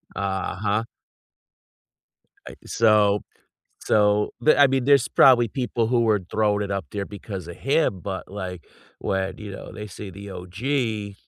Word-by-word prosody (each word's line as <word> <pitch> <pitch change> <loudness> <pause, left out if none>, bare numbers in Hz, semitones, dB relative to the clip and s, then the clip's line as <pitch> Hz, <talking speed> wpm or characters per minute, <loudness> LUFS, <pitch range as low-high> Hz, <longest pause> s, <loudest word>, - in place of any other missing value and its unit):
Uh-huh. 100 +2 -1 1.6
I - - -8
so 105 -2 +3 0.6
so 105 0 +2
but, 155 - +4
I 145 - +8
mean, 135 -1 0
there's 140 -2 +4
probably 120 -3 +6
people 120 0 -1
who 120 +1 +2
were 110 -3 +2
throwing 105 -1 +1
it 100 - -4
up 100 -2 -2
there 100 -1 -3
because 100 -4 -8
of 85 - -8
him, 135 - +1
but, 95 0 -5
like, 95 -4 -6 0.3
when, 95 -1 -2
you 105 -1 -8
know, - - -9
they 105 -1 -7
say 100 0 -9
the 100 +2 -10
OG. 105 +3 -3
105 Hz, 150 wpm, -24 LUFS, 100-115 Hz, 1.6 s, I